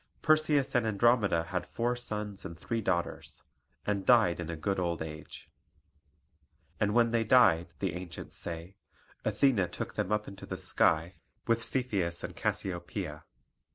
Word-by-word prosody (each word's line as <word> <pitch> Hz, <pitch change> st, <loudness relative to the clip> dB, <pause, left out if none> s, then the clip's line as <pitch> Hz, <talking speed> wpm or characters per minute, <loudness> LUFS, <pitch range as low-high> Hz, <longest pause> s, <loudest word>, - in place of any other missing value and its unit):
Perseus 155 Hz, -3 st, +3 dB
and 120 Hz, -2 st, +2 dB
Andromeda 105 Hz, -5 st, +3 dB
had 90 Hz, 0 st, -3 dB
four 120 Hz, +6 st, -1 dB
sons 105 Hz, -4 st, -5 dB
and 85 Hz, -, -7 dB
three 115 Hz, +5 st, -2 dB
daughters, 90 Hz, -4 st, -2 dB, 0.4 s
and 100 Hz, -2 st, 0 dB
died 105 Hz, -6 st, +5 dB
in 85 Hz, -2 st, -4 dB
a 85 Hz, -, -3 dB
good 95 Hz, +5 st, -1 dB
old 85 Hz, -2 st, -1 dB
age. 75 Hz, -1 st, -9 dB, 1.3 s
And 105 Hz, 0 st, +1 dB
when 120 Hz, -1 st, +5 dB
they 115 Hz, 0 st, +2 dB
died, 110 Hz, -8 st, +5 dB
the 95 Hz, 0 st, -2 dB
ancients 90 Hz, -1 st, -7 dB
say, 85 Hz, +3 st, -6 dB, 0.5 s
Athene 115 Hz, -10 st, +2 dB
took -, -, -5 dB
them 95 Hz, -, -2 dB
up 105 Hz, 0 st, 0 dB
into 100 Hz, -, -9 dB
the -, -, -4 dB
sky, 80 Hz, +3 st, +1 dB, 0.3 s
with 115 Hz, 0 st, +1 dB
Cepheus 105 Hz, -9 st, -1 dB
and -, -, -6 dB
Cassiopoeia. 85 Hz, -3 st, -3 dB
100 Hz, 150 wpm, -31 LUFS, 85-115 Hz, 1.3 s, died